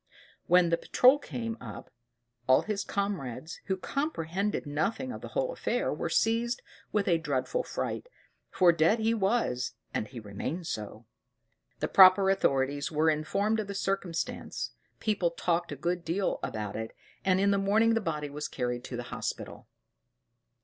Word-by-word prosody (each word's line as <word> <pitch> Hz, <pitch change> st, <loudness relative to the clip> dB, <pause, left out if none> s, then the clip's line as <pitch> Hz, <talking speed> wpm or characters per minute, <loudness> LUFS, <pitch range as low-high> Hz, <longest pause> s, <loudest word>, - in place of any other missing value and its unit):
When 180 Hz, 0 st, +5 dB
the 170 Hz, -, +2 dB
patrol 260 Hz, +3 st, +5 dB
came 230 Hz, -4 st, -5 dB
up, -, -, -9 dB, 0.6 s
all 130 Hz, 0 st, +5 dB
his 210 Hz, -2 st, -2 dB
comrades, 165 Hz, -, -3 dB
who 190 Hz, -1 st, -1 dB
comprehended 200 Hz, -, -2 dB
nothing 180 Hz, -, -1 dB
of -, -, -7 dB
the -, -, -6 dB
whole -, -, 0 dB
affair, -, -, -1 dB
were -, -, -3 dB
seized 230 Hz, +2 st, +1 dB, 0.3 s
with 210 Hz, -2 st, +1 dB
a 170 Hz, -3 st, +3 dB
dreadful 150 Hz, -, -1 dB
fright, -, -, -4 dB, 0.4 s
for 180 Hz, -2 st, +5 dB
dead 165 Hz, +6 st, +3 dB
he 225 Hz, 0 st, +1 dB
was, 195 Hz, -, 0 dB, 0.2 s
and 110 Hz, -, -1 dB
he 125 Hz, 0 st, -8 dB
remained 110 Hz, -, -5 dB
so. 110 Hz, -5 st, -5 dB, 0.8 s
The -, -, +1 dB
proper 190 Hz, 0 st, +7 dB
authorities 140 Hz, -6 st, +1 dB
were 160 Hz, +1 st, +3 dB
informed 200 Hz, +8 st, 0 dB
of 215 Hz, -, -3 dB
the 200 Hz, -, -5 dB
circumstance, 195 Hz, -4 st, -2 dB, 0.3 s
people 205 Hz, -5 st, +1 dB
talked 170 Hz, 0 st, -1 dB
a -, -, -3 dB
good 170 Hz, +5 st, -2 dB
deal 180 Hz, +4 st, -1 dB
about 105 Hz, -2 st, -4 dB
it, 110 Hz, 0 st, -5 dB, 0.3 s
and 185 Hz, -1 st, +3 dB
in 200 Hz, +1 st, +3 dB
the 200 Hz, -, +2 dB
morning 215 Hz, +4 st, +3 dB
the 225 Hz, -, +1 dB
body 150 Hz, -5 st, -3 dB
was 150 Hz, +1 st, -4 dB
carried 125 Hz, -1 st, -3 dB
to 125 Hz, -, -5 dB
the 120 Hz, -, -4 dB
hospital. -, -, -5 dB
180 Hz, 160 wpm, -29 LUFS, 150-210 Hz, 0.8 s, proper